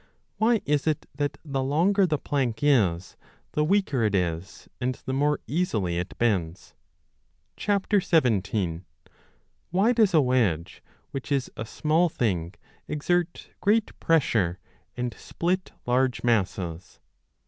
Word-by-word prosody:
Why 225 0 +2
is 145 +1 +1
it 155 -2 0
that 145 +1 -2
the 135 -3 -2
longer 180 +9 +3
the 155 -3 +1
plank 130 -6 -2
is 95 -12 +2 0.3
the 150 - +1
weaker 165 - +1
it 105 -2 +1
is 85 -1 -3
and 125 0 0
the 130 - -2
more 145 +2 +1
easily 110 - -1
it 90 - -6
bends? 95 -7 -1 0.9
17. 115 - +1 0.9
Why 200 +7 +3
does 215 -6 +3
a - - +7
wedge, 105 - 0 0.3
which 135 +1 -6
is 135 -2 0
a 110 - -5
small 160 +7 +2
thing, 95 - -1 0.3
exert 170 +3 -1
great 215 +2 +1
pressure 110 - +2 0.4
and 125 -1 -2
split 185 +2 -2
large 125 +1 +1
masses 95 -6 -1
130 Hz, 125 wpm, -26 LUFS, 100-165 Hz, 0.9 s, a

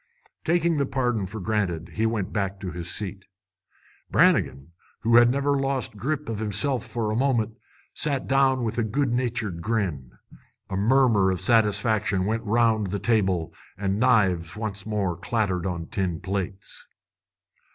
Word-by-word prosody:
Taking 170 -1 +2
the 140 -2 +1
pardon 125 -7 -1
for 110 +4 -7
granted, 90 -5 -2
he 110 +1 +1
went 110 -4 -2
back 100 -2 -2
to 95 -3 -4
his 85 0 -5
seat. 100 -1 -4 0.8
Brannigan, 70 +5 +2 0.3
who 115 +1 +4
had 120 0 +7
never 140 +2 +1
lost 135 -4 -1
grip 145 +7 -3
of 110 -2 -3
himself 110 +5 0
for 110 -1 -2
a - - -1
moment, 115 -4 +1 0.4
sat 140 -3 -1
down 135 0 +4
again 130 -2 -2
with 115 +1 -2
a - - +2
good 120 +3 0
natured 115 -8 -1
grin. 90 - -2 0.6
A - - -1
murmur 110 -2 +3
of 95 -1 -1
satisfaction 105 -4 +2
went 110 +2 -1
round 110 -1 +2
the 100 +2 -2
table, 95 -7 0 0.2
and 100 +1 -1
knives 95 -9 +2
once 105 -2 -5
more 100 -5 -1
clattered 95 -2 -1
on 85 -2 -3
tin 90 -2 -2
plates. 95 +1 -5
110 Hz, 155 wpm, -25 LUFS, 95-120 Hz, 0.8 s, had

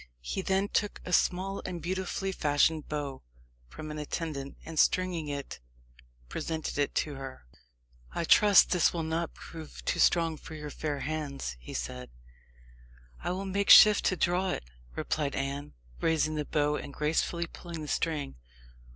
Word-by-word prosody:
He 190 - -2
then 190 +1 +1
took 205 0 -1
a 180 - -4
small 190 +3 +1
and 180 -2 -4
beautifully 190 +3 -2
fashioned 150 -1 +2
bow 145 -3 -4 0.5
from 155 - -8
an 150 - -5
attendant, 150 -2 -4
and 160 -1 -3
stringing 180 -4 +2
it, 140 -1 -5 0.7
presented 160 - -3
it 145 - 0
to 150 - 0
her. 135 - -8 0.7
"I - - 0
trust 205 +4 +6
this 180 -3 +3
will 170 -2 -2
not 160 +1 -2
prove 160 -2 -10
too - - 0
strong 165 -2 +3
for 160 - -10
your 150 -1 -6
fair 145 -2 -3
hands," 145 - -3
he - - -9
said. 65 +1 -5 1.1
"I - - -3
will 185 +2 -2
make 200 +1 -1
shift 210 -1 +9
to 185 - +3
draw 180 +2 +1
it," - - -2 0.3
replied 145 - -1
Anne, 140 +1 -3 0.3
raising 160 -1 +1
the 150 -1 -2
bow, 150 0 +1
and - - -7
gracefully 160 +4 0
pulling 170 -1 -8
the - - -6
string. 150 - -1
160 Hz, 160 wpm, -30 LUFS, 145-180 Hz, 1.1 s, shift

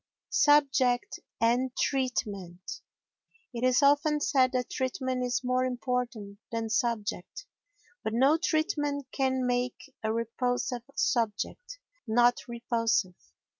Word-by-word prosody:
Subject 270 -4 +3 0.2
and 245 +3 +1
Treatment 200 -9 -2 0.7
It 235 0 -4
is 255 +2 +4
often 290 +2 +4
said 260 -3 +3
that 250 -1 -1
treatment 260 -1 -2
is 245 +1 -1
more 255 0 +1
important 245 -5 -3
than 225 -1 -3
subject, 230 - -2 0.6
but 220 - -1
no 265 +7 +4
treatment 295 -4 0
can 260 -1 0
make 245 0 -2
a 220 -1 -1
repulsive 245 +2 -1
subject 235 - -1 0.3
not 240 +2 +4
repulsive. 230 -5 0
250 Hz, 105 wpm, -29 LUFS, 230-265 Hz, 0.7 s, is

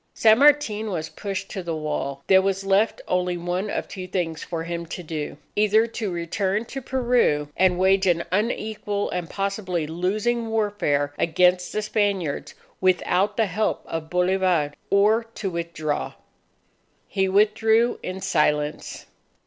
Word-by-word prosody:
San 220 +1 +5
Martin 275 -7 +4
was 160 -4 -3
pushed 195 -1 -5
to 195 - -4
the 170 -2 -3
wall. 150 -3 -3
There 190 -1 +6
was 195 0 -1
left 195 +3 +2
only 180 -1 0
one 175 +4 -2
of - - -3
two 185 -1 -7
things 165 -4 -2
for 165 -2 -4
him 170 0 -5
to 180 - -6
do 155 -3 -5 0.2
either 215 +2 +4
to 225 -2 -4
return 190 +5 -1
to 270 +3 -6
Peru 240 - +1
and 185 -1 +3
wage 190 +1 +3
an 170 -1 +2
unequal 210 0 -1
and 175 -2 -3
possibly 195 -4 -2
losing 210 +9 -1
warfare 205 -10 0
against 180 +2 +2
the 215 - -2
Spaniards 200 -8 -1 0.3
without 185 +2 +2
the 225 - +3
help 210 +3 -1
of 160 -1 -5
Bolivar, 180 -4 +1 0.2
or 215 +3 +3
to 195 -3 -3
withdraw. 170 -3 -3 0.9
He 190 -1 0
withdrew 220 +4 +3
in 185 +1 -5
silence. 150 -2 0
190 Hz, 145 wpm, -24 LUFS, 170-210 Hz, 0.9 s, There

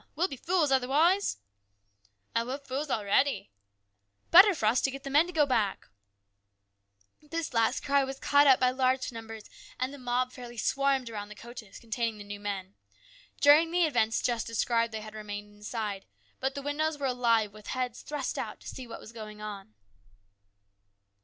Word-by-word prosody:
We'll 345 +5 +2
be 275 - -7
fools 325 +1 +1
otherwise! 300 +10 +3 0.3
" 100 0 -46
" 100 0 -38
Ay, 230 - +2
we're 255 +3 -4
fools 280 +1 -4
a'ready! 215 - +1 0.3
" 100 0 -50
" 100 0 -45
Better 380 +2 +9
for 220 - -2
us 225 +4 +3
to - - +1
get 270 0 -7
the 275 - -5
men 300 +5 +5
to - - -6
go 310 -4 +3
back! 220 -7 -1 0.7
" 100 0 -43
This 330 -4 -3
last 230 +3 +1
cry 280 0 +3
was 270 0 -5
caught 285 0 +4
up 265 -2 +7
by 255 -1 +3
large 255 0 +1
numbers, 225 -2 -8 0.4
and 255 +2 -1
the 285 - -10
mob 250 0 0
fairly 245 -2 -10
swarmed 275 +3 +1
round 205 -2 -6
the 210 - -10
coaches 235 -2 -11
containing 230 -1 -3
the 205 - -8
new 205 0 -7
men. 200 -2 -5 0.7
During 300 +3 +7
the 350 0 +3
events 230 -7 +1
just 235 -2 0
described 230 0 +1
they 220 -1 -5
had 215 0 -9
remained 205 -1 -7
inside, 210 -1 -5 0.3
but 265 +1 -1
the 280 - -5
windows 300 +2 -1
were 285 - -3
alive 230 -5 +2
with 215 -1 -13
heads 250 -2 -3
thrust 295 -3 -4
out - - -5
to - - -12
see 255 -2 -7
what 230 - -8
was 220 - -12
going 215 -2 -9
on. 200 - -8
240 Hz, 190 wpm, -29 LUFS, 210-275 Hz, 0.7 s, Better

